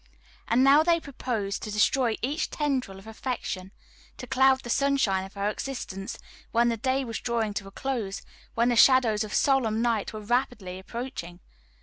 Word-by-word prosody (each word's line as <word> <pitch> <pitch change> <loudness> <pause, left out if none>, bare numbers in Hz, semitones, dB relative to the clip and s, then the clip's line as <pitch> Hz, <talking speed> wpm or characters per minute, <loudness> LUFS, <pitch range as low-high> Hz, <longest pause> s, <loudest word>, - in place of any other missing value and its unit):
And 245 +3 +3
now 280 +3 +7
they 335 +1 +3
proposed 230 -9 -3
to 215 - -5
destroy 225 +3 +2
each 290 +6 -1
tendril 265 -10 -2
of 195 - -14
affection, 220 -5 -5 0.5
to - - -7
cloud 265 +1 +3
the 240 - -9
sunshine 270 -10 +2
of 195 +2 -14
her 200 +1 -1
existence 210 -4 -5 0.3
when 235 +1 +3
the 230 - 0
day 260 +4 0
was 230 -2 -4
drawing 230 -3 -1
to 200 -1 -4
a - - -11
close, 225 -6 -3 0.3
when 235 +1 +3
the 240 - +2
shadows 235 -4 +5
of 215 - -7
solemn 240 -6 +2
night 230 -3 0
were 215 - -6
rapidly 215 -5 -1
approaching. 190 -5 -7
235 Hz, 175 wpm, -27 LUFS, 205-265 Hz, 0.5 s, now